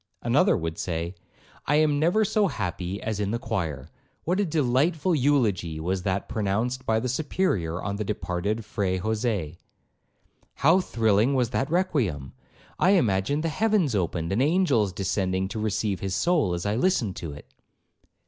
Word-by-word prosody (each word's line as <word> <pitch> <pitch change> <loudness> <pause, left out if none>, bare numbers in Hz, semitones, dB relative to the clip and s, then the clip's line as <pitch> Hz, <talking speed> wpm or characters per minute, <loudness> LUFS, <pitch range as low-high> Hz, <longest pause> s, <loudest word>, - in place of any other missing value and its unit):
Another - - +3
would 80 0 -4
say, 85 0 -3 0.5
'I 150 +2 +4
never 155 +8 +2
am - - +3
so 210 0 +2
happy 90 - -3
as 110 -2 -2
in 100 -1 -1
the 115 - 0
choir! 85 - -3 0.4
What 180 +4 0
a 205 - +2
delightful 155 +3 +1
eulogy 115 - +1
was 90 +3 -1
that 95 0 -2
pronounced 110 +5 -2
by 110 0 +2
the 125 - -2
Superior 125 - -1
on 100 +2 -3
the 105 - -2
departed 105 +1 -2
Fre 105 -1 -2
Jose! 105 -5 -2 1.0
How 165 +6 +4
thrilling 115 - +2
was 125 -3 +1
that 135 - -1
requiem! 125 - 0 0.5
I 185 - +5
imagined 130 - +1
the 165 - 0
heavens 205 - +1
opened, 85 -3 -1
and 105 +6 +1
angels 140 - +2
descending 95 0 -1
to 110 - -4
receive 105 -2 -1
his 95 -2 -2
soul, 145 - +2
as 85 - -5
I 105 - +1
listened 125 - +1
to 80 -4 -5
it!' 75 - -13
110 Hz, 160 wpm, -26 LUFS, 95-145 Hz, 1.0 s, I